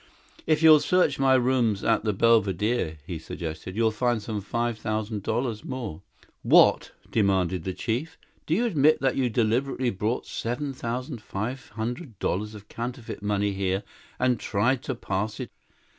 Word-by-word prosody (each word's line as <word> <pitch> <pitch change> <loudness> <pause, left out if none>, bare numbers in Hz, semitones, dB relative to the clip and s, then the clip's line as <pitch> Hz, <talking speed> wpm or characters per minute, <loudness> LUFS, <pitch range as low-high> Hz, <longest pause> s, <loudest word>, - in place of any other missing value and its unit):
"If 155 0 +2
you'll 155 -1 +9
search 180 +1 +2
my 135 -1 +5
room 125 -4 +2
at 115 - +2
the 110 - +1
Belvedere," 105 -4 +2
he 85 -2 -5
suggested, 80 +3 -6
"you'll 110 0 +2
find 120 +1 0
some 105 0 -4
five 115 +2 -2
thousand 110 -1 -2
dollars 115 +1 -2
more." 120 -11 -5 0.4
"What?" - - +5 0.2
demanded 95 -4 +1
the 95 - -2
chief. 120 - -3 0.3
"Do 160 - +2
you 235 +6 +2
admit 155 - +4
that 135 -1 +2
you 130 -2 +1
deliberately 120 +3 +1
brought 105 +5 -2
seven 135 +4 -3
thousand 125 0 -4
five 115 +6 -5
hundred 120 - -4
dollars 105 +5 -2
of 105 0 -12
counterfeit 120 -1 -6
money 105 0 0
here 95 0 -1 0.3
and 125 -2 +2
tried 120 +5 +1
to 130 - -2
pass 105 0 -3
it?" - - -5
115 Hz, 160 wpm, -26 LUFS, 105-130 Hz, 0.4 s, you'll